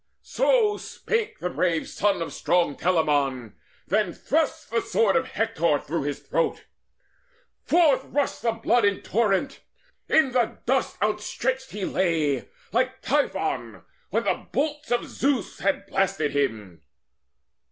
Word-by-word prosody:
So 475 -4 +2
spake 445 -1 -3
the 180 - -3
brave 170 -3 0
son 195 -3 0
of - - -7
strong 170 -5 +1
Telamon, 145 - +1 0.3
Then 200 -3 +1
thrust 310 -3 -1
the 230 0 +1
sword 205 -4 +2
of 260 -1 +2
Hector 170 - +1
through 155 0 -3
his 145 -1 -3
throat. - - -1 1.0
Forth 315 -6 +4
rushed 285 -1 -1
the 230 -1 +1
blood 230 +1 +2
in 200 -1 +1
torrent: 230 +5 0 0.5
in 315 -5 +4
the 245 -2 +1
dust 260 +1 0
Outstretched 235 +5 -1
he 200 -2 -4
lay, 155 -8 0 0.2
like 255 +3 0
Typhon, 290 +1 -1 0.3
when - - 0
the - - -1
bolts 300 +1 -1
Of 240 - +1
Zeus 270 -6 -1
had 195 +1 0
blasted 180 -7 0
him. 110 - -2
210 Hz, 130 wpm, -25 LUFS, 165-265 Hz, 1.0 s, Forth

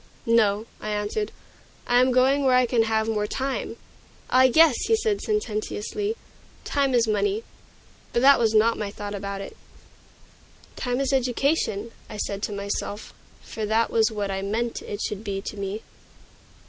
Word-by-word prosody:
"No," 220 -2 +3
I 215 - -5
answered, 210 - -2 0.5
"I 245 0 +4
am 255 0 +3
going 265 +3 +3
where 260 -2 +4
I 250 0 +5
can 240 -1 +2
have 220 0 0
more 210 -2 0
time." 270 +4 -3 0.6
"Ah, 260 +1 +6
yes!" 315 -2 +5
he 450 - +4
said 440 -2 0
sententiously, 415 - -2 0.5
"time 275 -2 +1
is 235 -1 +3
money." 405 - 0 0.7
But 240 - +1
that 280 -1 +7
was 225 -2 +2
not 225 +2 +4
my 210 -2 -2
thought 205 0 -6
about 200 0 -4
it. 195 - -8 1.2
"Time 245 0 -2
is 275 0 0
education," 250 -4 0 0.2
I 210 - -7
said 200 -1 -3
to 210 - -2
myself; 200 +1 -4 0.3
for 220 - -6
that 225 +2 +2
was 220 -1 +3
what 205 -2 -3
I 195 0 -2
meant 225 +4 -2
it 205 +1 -5
should 210 0 -4
be 200 -2 -3
to - - -6
me. 200 +2 -4
225 Hz, 165 wpm, -25 LUFS, 210-260 Hz, 1.2 s, that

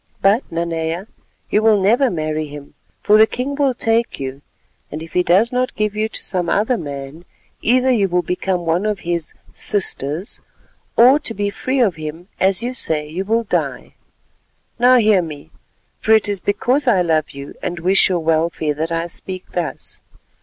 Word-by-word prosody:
But, 205 +6 +3
Nanea, 165 +1 -2 0.5
you 210 - +3
will 220 -2 +4
never 235 +8 +3
marry 155 -3 -2
him, 145 -1 -11 0.3
for 210 - +5
the 220 - +7
king 255 +5 -3
will 280 -3 +1
take 230 0 +1
you; 135 0 -5 0.5
and, 155 +2 -5
if 165 - -12
he 180 - +3
does 190 +7 +3
not 255 0 -1
give 210 0 -1
you 215 +1 -1
to - - -7
some 180 -3 -2
other 220 +5 +2
man, 145 -2 -7 0.4
either 255 +2 +3
you 205 -6 +2
will 175 0 +1
become 180 +1 -1
one 170 +5 +1
of 210 -2 -2
his 170 -2 -3 0.2
'sisters,' 175 -3 0 0.6
or 255 +5 +7
to 230 -6 -3
be 205 0 -1
free 260 +6 -2
of 200 -9 +2
him, 160 +4 -7
as 195 +3 +2
you 250 +1 -2
say, 155 -10 -1
you 170 +5 -4
will 225 +3 +1
die. 215 - -3 0.9
Now 250 +1 +6
hear 215 -5 +4
me, 155 -1 -9 0.5
for 220 - +3
it 220 -1 +4
is 205 -2 -2
because 255 +9 0
I 195 -7 +4
love 160 -2 +1
you 140 0 -9
and 175 -1 -4
wish 190 +4 +3
your 180 -2 0
welfare 160 -1 0
that 160 +3 -3
I 165 0 -1
speak 185 +2 -5
thus. 175 -3 -5
185 Hz, 180 wpm, -19 LUFS, 165-220 Hz, 0.9 s, the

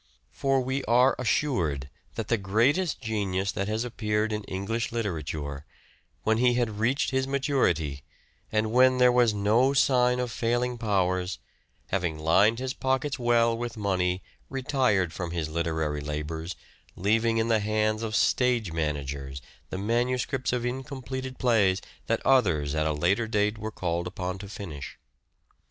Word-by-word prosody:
For 135 - +1
we 130 +2 -2
are 125 +3 +4
assured 90 - 0 0.3
that - - -3
the 115 - +2
greatest 130 - +1
genius 100 -4 -1
that 100 - -3
has 110 +2 -1
appeared 110 -2 -1
in 105 0 -3
English 100 +5 -3
literature, 75 -10 -3 0.6
when 110 +1 +2
he 125 0 +4
had 115 -4 -1
reached 125 +6 +1
his 130 0 0
maturity, 125 - 0 0.5
and 110 0 +1
when 130 +1 +5
there 125 0 +6
was 120 -2 +4
no 110 +7 +3
sign 125 -2 +3
of 125 -1 -2
failing 120 +1 -1
powers, 95 -4 0 0.5
having 90 -5 -1
lined 95 +9 +4
his 130 +1 -3
pockets 135 +2 -1
well 115 -1 +3
with 120 0 -5
money, 95 -3 0 0.3
retired 130 - +1
from 85 +2 -4
his 85 -2 -3
literary 80 -2 -1
labours, 75 +4 -4 0.4
leaving 115 +4 +2
in 115 0 +1
the 110 -1 +4
hands 110 +1 0
of 110 -1 -3
stage 120 -8 +2
managers 70 -4 -3 0.3
the - - -4
manuscripts 125 +5 0
ot 125 -1 -1
incompleted 130 0 -5
plays, 105 -6 +3 0.3
that - - -1
others, 85 - +3
at 80 0 +1
a - - +1
later 90 +10 +1
date, 105 0 0
were 110 +1 -4
called 85 -4 -2
upon 90 0 -4
to 100 0 -8
finish. 85 -9 -7
110 Hz, 150 wpm, -27 LUFS, 90-125 Hz, 0.6 s, there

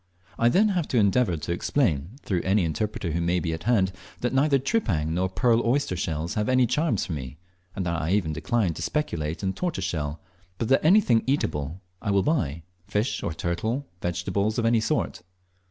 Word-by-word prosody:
I 115 - +5
then 210 - +4
have 180 -6 0
to 125 - 0
endeavour 100 -3 +3
to 80 - -4
explain, 85 - 0
through 90 -4 0
any 95 -1 +2
interpreter 90 +2 -2
who 85 +2 -1
may 85 +1 +1
be 80 -2 -2
at 80 - -6
hand, 105 -6 +3 0.3
that 125 - 0
neither 140 +1 +4
tripang 105 - 0
nor 90 +2 0
pearl 115 +5 +2
oyster 130 -4 +1
shells 80 0 -2
have 105 +1 -1
any 130 -1 +4
charms 150 - 0
for 85 - -4
me, 65 -1 -6 0.4
and 95 - -2
that 85 -1 -1
I 80 +4 0
even 90 -7 +1
decline 90 +4 0
to 80 - -8
speculate 85 - -2
in 95 0 0
tortoiseshell, 90 - -2 0.4
but 115 - -2
that 135 - +4
anything 155 - +5
eatable 80 - -1 0.2
I 105 - -3
will 100 -1 +3
buy 85 - 0 0.2
fish, 105 +5 -1
or - - -2
turtle, 85 +6 -2
or 130 +5 -1 0.2
vegetables 90 +5 -1
of 115 - +1
any 115 0 +4
sort. 110 - -1
100 Hz, 195 wpm, -26 LUFS, 85-125 Hz, 0.4 s, I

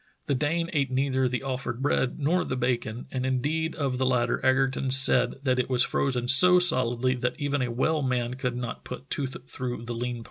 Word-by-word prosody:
The 140 - -1
Dane 160 +5 -1
ate 140 -3 0
neither 130 0 -1
the 125 +1 -4
offered 130 -3 -5
bread 135 -2 -1
nor 165 +5 0
the 130 - -4
bacon, 120 -2 -3
and 130 -1 -4
indeed 145 +5 -2
of 135 -4 -3
the 130 - 0
latter 125 -2 -1
Egerton 135 0 0
said 130 -2 +5
that 130 -2 0
it 125 - -2
was 125 -2 +4
frozen 125 -3 -2
so 180 +8 +8
solidly 130 -7 +4
that 125 +3 -4
even 145 -1 -2
a 125 - -2
well 150 +6 -1
man 125 -2 -2
could 125 -1 -4
not 125 -1 -6
put 130 +2 -10
tooth 135 -2 -3
through 125 -3 -6
the 120 - -5
lean 120 +1 -4
parts. - - -9
130 Hz, 210 wpm, -25 LUFS, 125-140 Hz, -, so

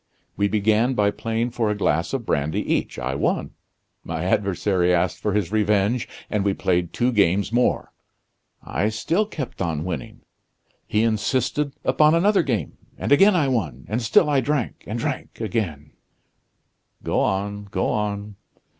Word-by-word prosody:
We 100 +1 +2
began 110 +4 +2
by 100 -2 +3
playing 115 +3 -2
for 115 -2 0
a 105 - 0
glass 85 -3 0
of 130 -4 -3
brandy 75 -2 0
each. - - -1
I - - -2
won. - - -1 0.5
My 80 0 -4
adversary 95 -1 +1
asked 90 -1 +1
for 105 - -1
his 100 -3 0
revenge, 105 +2 +1 0.2
and 105 -2 -1
we 100 -1 +1
played 90 -2 0
two 120 +6 +1
games 100 0 +2
more. 125 +1 +1 0.7
I 105 - -1
still 165 - 0
kept 140 - -6
on 80 -3 -1
winning. 90 -3 -5 0.7
He 105 +1 +1
insisted 125 +6 0
upon 150 +4 +4
another 195 +4 +4
game, 125 -9 -2 0.2
and - - -3
again 195 +7 +6
I 155 -6 +2
won, 85 - -2
and 110 +4 -1
still 120 +7 +4
I 145 -2 +3
drank 145 -5 -2
and 110 - -3
drank 135 +3 -4
again 90 -9 -3 0.5
" - - -42
"Go - - 0
on, 100 +1 -1
go 95 -1 -1
on." 105 -1 -3
105 Hz, 160 wpm, -23 LUFS, 95-125 Hz, 0.7 s, again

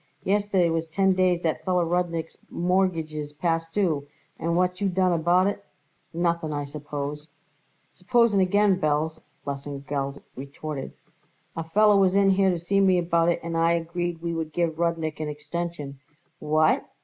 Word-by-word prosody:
Yesterday 195 -3 +2
was 165 0 -1
ten 190 +4 +2
days 185 -2 +2
that 155 -1 -1
feller 180 0 +1
Rudnik's 170 -1 -2
mortgage 175 -3 0
is 150 -1 -5
past 165 +1 -1
due, 160 -8 0 0.3
and 170 +1 0
what 180 0 +3
did 180 +2 -17
you 200 - +2
done 185 0 +2
about 175 +3 +3
it? 200 0 -2 0.5
Nothing, 170 -1 -1
I 145 -1 -2
suppose." 145 0 -6 0.6
"Suppose 235 +4 +2
again, 195 0 +3
Belz," 155 +1 0 0.3
Lesengeld 140 0 -4
retorted. 140 +1 -6 0.6
"A 165 - -3
feller 205 +5 +4
was 190 -1 +3
in 200 -1 +5
here 190 0 +3
to 180 - +1
see 175 +4 0
me 190 -2 +4
about 170 -1 +2
it 170 - 0
and 165 0 -4
I 165 +1 +3
agreed 170 0 -3
we 170 0 -2
would 160 -2 -4
give 165 -2 -1
Rudnik 165 -2 -1
an 155 - -3
extension." 150 -1 -5 0.4
"What!" 155 +1 +2
170 Hz, 160 wpm, -25 LUFS, 155-185 Hz, 0.6 s, in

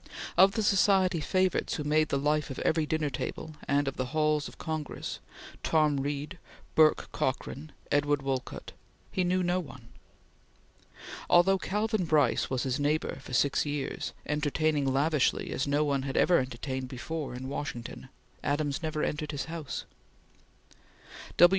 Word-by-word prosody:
Of 190 +2 +6
the 220 - 0
society 190 -3 +4
favorites 185 +3 +1
who 150 - -3
made 155 +1 +2
the 140 - +1
life 150 +2 +1
of 135 - -6
every 160 -1 +1
dinner 155 -2 0
table 155 +4 -4
and 145 0 +2
of 135 - -3
the 130 - -1
halls 150 -1 +2
of - - -12
Congress 155 -2 -4 0.4
Tom 155 -3 +2
Reed, 145 +5 -3 0.3
Bourke 155 -1 +4
Cockran, 140 +3 -3 0.2
Edward 145 -1 +2
Wolcott 135 -1 -3 0.4
he 185 - 0
knew 180 +1 +1
not 180 +1 +1
one. 130 -6 -12 1.4
Although 190 +2 +5
Calvin 210 0 0
Brice 145 -7 +2
was 130 -2 -1
his 130 +1 -1
next 145 0 +2
neighbor 155 -2 -1
for 130 - -10
six 140 +3 +3
years, 145 -2 -3
entertaining 150 -1 +1
lavishly 145 +1 +1
as 135 - -1
no 145 +2 +2
one 140 -2 +1
had 135 0 -3
ever 180 - +5
entertained 130 +1 -4
before 135 +2 -5
in 130 +1 -6
Washington, 130 -3 -5 0.3
Adams 145 0 0
never 155 -2 -2
entered 150 0 -2
his 145 -2 -3
house. 160 -4 -5
150 Hz, 150 wpm, -29 LUFS, 140-160 Hz, 1.4 s, Of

